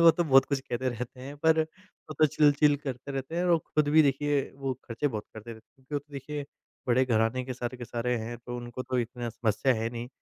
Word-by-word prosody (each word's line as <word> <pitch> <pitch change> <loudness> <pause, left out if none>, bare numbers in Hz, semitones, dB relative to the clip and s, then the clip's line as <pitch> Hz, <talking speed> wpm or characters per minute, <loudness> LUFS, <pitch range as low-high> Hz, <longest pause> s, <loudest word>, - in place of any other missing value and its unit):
वो 165 - +10
तो 170 +2 0
बहुत 135 -3 +6
कुछ 140 -2 -1
कहते 130 0 -2
रहते 125 +1 -5
हैं 140 +3 -8
पर 160 0 +5
वो 170 -1 -13
तो 155 - +7
चिल-चिल 145 0 +4
करते 135 -1 -6
रहते 135 +5 -4
हैं, 175 - +1
वो 175 -2 +4
खुद 150 -1 0
भी 155 +2 +7
देखिए 145 0 +2 0.2
वो 135 -1 -2
ख़र्चे 115 +5 -1
बहुत 110 -5 -4
करते 110 +2 -8
रहते 110 - -12
हैं। 130 - -30
क्योंकि - - -5
वो 145 - +2
तो 145 +1 -21
देखिए 145 +1 -5 0.4
बड़े 130 +2 +4
घराने 115 +1 +1
के 130 - -4
सारे 120 0 -4
के 120 - -5
सारे 120 +1 -1
हैं 115 +2 -5
तो 120 +1 -6
उनको 120 +1 -6
तो 130 0 -1
इतना 120 0 -3
समस्या 120 +3 +1
है 110 +1 -1
नहीं। 120 0 -6
130 Hz, 245 wpm, -29 LUFS, 120-145 Hz, 0.4 s, वो